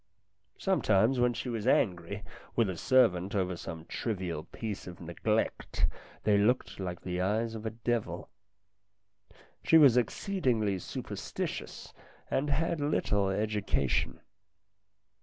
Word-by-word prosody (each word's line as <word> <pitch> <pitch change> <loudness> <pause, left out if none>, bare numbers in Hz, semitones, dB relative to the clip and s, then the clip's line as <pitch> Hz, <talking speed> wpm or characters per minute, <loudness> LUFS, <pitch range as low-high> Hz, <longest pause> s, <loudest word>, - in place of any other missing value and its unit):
Sometimes 125 - +3
when 120 -1 +3
she - - -4
was 115 -2 -2
angry 95 -3 +1 0.3
with 115 -5 +2
a - - -5
servant 100 -3 +3
over 95 -2 0
some 80 -1 -7
trivial 90 -7 -3
piece 105 0 -6
of 90 -1 -9
neglect, 85 -1 -1 0.4
they 105 -1 +4
looked 120 +2 +1
like 90 -2 -4
the 90 0 -2
eyes 110 +4 0
of 110 0 -5
a 110 - -6
devil. 120 -3 -1 1.4
She 165 - +6
was 140 -6 +7
exceedingly 120 - +1
superstitious - - -5 0.4
and 145 +2 +1
had 160 +2 0
little 105 -9 +1
education. 100 - 0
105 Hz, 120 wpm, -31 LUFS, 90-120 Hz, 1.4 s, was